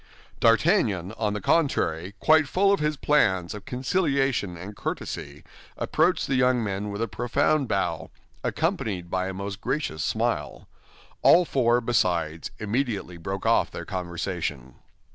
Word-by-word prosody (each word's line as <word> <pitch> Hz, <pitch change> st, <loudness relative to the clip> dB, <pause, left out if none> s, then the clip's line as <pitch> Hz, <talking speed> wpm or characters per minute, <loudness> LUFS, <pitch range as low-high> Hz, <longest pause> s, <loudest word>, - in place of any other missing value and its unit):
D'Artagnan, 105 Hz, -5 st, +3 dB
on 110 Hz, -2 st, -2 dB
the 105 Hz, -, -2 dB
contrary, 95 Hz, -, +1 dB
quite 155 Hz, -1 st, +4 dB
full 195 Hz, +6 st, +3 dB
of 200 Hz, -, +1 dB
his 150 Hz, 0 st, 0 dB
plans 95 Hz, -13 st, +2 dB
of 105 Hz, -1 st, -9 dB
conciliation 135 Hz, -, 0 dB
and 100 Hz, +4 st, -8 dB
courtesy, 75 Hz, -6 st, -5 dB, 0.3 s
approached 170 Hz, +4 st, +1 dB
the 135 Hz, -, -2 dB
young 125 Hz, -2 st, +3 dB
men 100 Hz, 0 st, -3 dB
with 100 Hz, +2 st, -3 dB
a -, -, -1 dB
profound 125 Hz, +7 st, +1 dB
bow, 95 Hz, -6 st, -1 dB, 0.3 s
accompanied 115 Hz, -, -2 dB
by 95 Hz, 0 st, 0 dB
a 95 Hz, -, -4 dB
most 100 Hz, +1 st, -5 dB
gracious 130 Hz, -, -2 dB
smile. -, -, -2 dB, 0.5 s
All 175 Hz, +1 st, +6 dB
four, 120 Hz, -4 st, +2 dB
besides, 85 Hz, -9 st, 0 dB
immediately 105 Hz, -5 st, -2 dB
broke 95 Hz, +4 st, -5 dB
off -, -, +3 dB
their -, -, -7 dB
conversation. 85 Hz, -7 st, -4 dB
105 Hz, 140 wpm, -26 LUFS, 90-135 Hz, 0.5 s, All